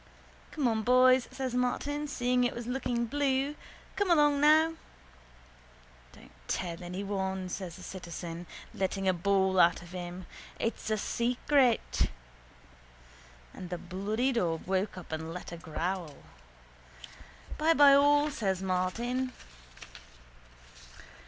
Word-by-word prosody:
—Come 285 -5 -1
on 220 -2 +1
boys, 255 +2 +5
says 260 -2 -4
Martin, 290 +4 -1
seeing 250 -2 +1
it 245 - 0
was 235 - -5
looking 245 -1 -1
blue. 275 +2 0 0.4
Come 405 -2 0
along 295 -4 +4
now. 315 +2 +5 1.4
—Don't - - -17 0.2
tell 170 -2 -3
anyone, 190 +1 -3
says 180 -2 -5
the - - -12
citizen, 175 -2 -7 0.3
letting 195 0 -2
a 185 - +4
bawl 190 +1 +2
out 175 0 +4
of 175 - -13
him. 180 0 -6 0.3
It's 225 -1 -2
a 215 - +1
secret. 245 +3 +1 1.4
And 180 - -8
the 180 - -3
bloody 205 +9 -1
dog 170 -10 -1
woke 190 +1 -1
up 180 - -10
and 160 +1 -4
let 180 0 -7
a 170 - -6
growl. 170 0 -4 1.4
—Bye 325 +2 +4
bye 285 -1 +8
all, 290 +1 +4
says 195 -9 -1
Martin. 235 +8 -1
215 Hz, 120 wpm, -30 LUFS, 180-260 Hz, 1.4 s, bye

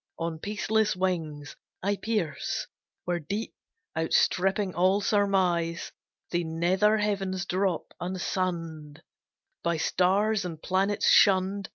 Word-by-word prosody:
On 165 -1 -3
peaceless 215 +2 0
wings 160 -6 -2 0.3
I 200 +1 +1
pierce, 200 -9 -2 0.4
where 175 -1 0
deep 200 +8 -4 0.4
outstripping 185 +4 +1
all 185 +3 +3
surmise, 185 -5 +1 0.4
The 175 0 0
nether 180 +6 +2
heavens 195 -3 -1
drop 185 -2 -1
unsunned, 170 -4 -3 0.6
By 170 -1 +1
stars 195 +6 +2
and 165 -3 -6
planets 195 +4 0
shunned. 195 0 +4
185 Hz, 100 wpm, -27 LUFS, 170-200 Hz, 0.6 s, shunned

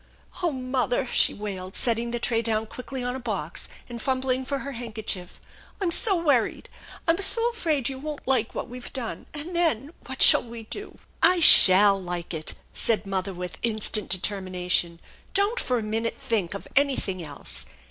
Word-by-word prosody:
" - - -16
Oh 345 -2 +1
mother! 255 -3 -1
" - - -9
she - - +4
wailed, 195 -3 -7
setting 235 0 -1
the 240 - -3
tray 230 -1 0
down 220 -1 -1
quickly 250 +3 -7
on 250 +1 -2
a - - -5
box 200 -10 -4 0.2
and 235 -2 -8
fumbling 260 0 -1
for 280 +2 -3
her 280 - -5
handkerchief. 220 -7 -6 0.2
" - - -26
I'm 370 -4 -1
so 395 +3 +5
wor 295 -8 +3
ried! - - -10 0.4
I'm 335 +4 +2
so 465 +4 +4
afraid 310 - -1
you 265 -1 -4
won't 300 -1 -7
like 250 -4 0
what - - -4
we've 250 0 -9
done, 250 -4 -6
and 305 +4 -6
then 305 -5 0 0.2
what 265 -1 +1
shall - - +8
we 230 -1 -10
do?" 405 - -8
" - - -35
I - - -2
shall 195 - +9
like 175 -1 -5
it! 155 -1 -2
" - - -33
said 225 -2 +1
the 195 - -11
mother 190 0 -2
with 180 0 -7
instant 215 -2 -1
determina 185 -1 -2
tion. 170 -1 +2 0.2
" - - -31
Don't 405 +5 +2
for 250 - 0
a 225 - -3
minute 225 +2 -3
think 200 -6 -2
of 200 - -8
anything 260 -10 0
else. 145 -3 -5
235 Hz, 205 wpm, -25 LUFS, 200-275 Hz, 0.4 s, shall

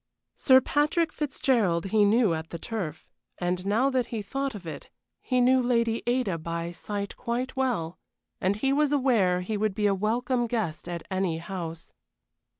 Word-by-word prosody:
Sir 260 -1 +6
Patrick 300 +5 +1
Fitzgerald 235 - +1
he 215 -1 +4
knew 215 -2 +4
at 160 0 -4
the 170 - -5
Turf, 165 -6 -5 0.3
and 180 0 -1
now 240 +7 +2
that 255 -2 +1
he 225 -3 -4
thought 270 +4 -3
of 190 -4 -9
it 155 -3 -7 0.3
he 255 -1 0
knew 255 +1 +5
Lady 235 -2 +1
Ada 240 -9 +1
by 170 +1 -4
sight 200 +3 -5
quite 250 +2 -3
well, 235 -11 -1 0.4
and 190 +2 +2
he 270 +6 +1
was 295 0 +2
aware 230 -11 +3
he 210 +4 -3
would 210 -1 0
be 210 -1 0
a 200 - +4
welcome 240 +5 0
guest 210 -8 -3
at 170 -2 -4
any 185 -3 0
house. 165 -1 -6
215 Hz, 170 wpm, -27 LUFS, 180-255 Hz, 0.4 s, Sir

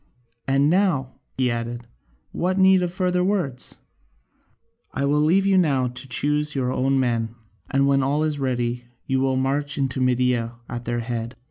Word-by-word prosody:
And 135 +1 +3
now," 165 -7 +1 0.2
he 130 -2 +2
added, 120 +1 -4 0.5
"what 185 +2 -1
need 190 -1 +5
of 175 -1 -1
further 180 -1 0
words? 180 -10 -2 1.1
I 140 - -1
will 145 +1 +2
leave 180 +6 +3
you 195 -1 +4
now 135 -7 +2
to 125 +2 -5
choose 150 +3 0
your 130 -2 0
own 135 +1 +1
men, 115 -3 -1 0.3
and 135 0 +2
when 140 0 +3
all 145 +3 +1
is 150 -2 -1
ready 120 -2 -1 0.2
you 135 -1 0
will 130 0 +1
march 140 +2 -1
into 135 -1 -1
Media 125 -2 +1
at 120 0 -6
their 120 0 -1
head. 115 0 -4
135 Hz, 165 wpm, -23 LUFS, 125-150 Hz, 1.1 s, need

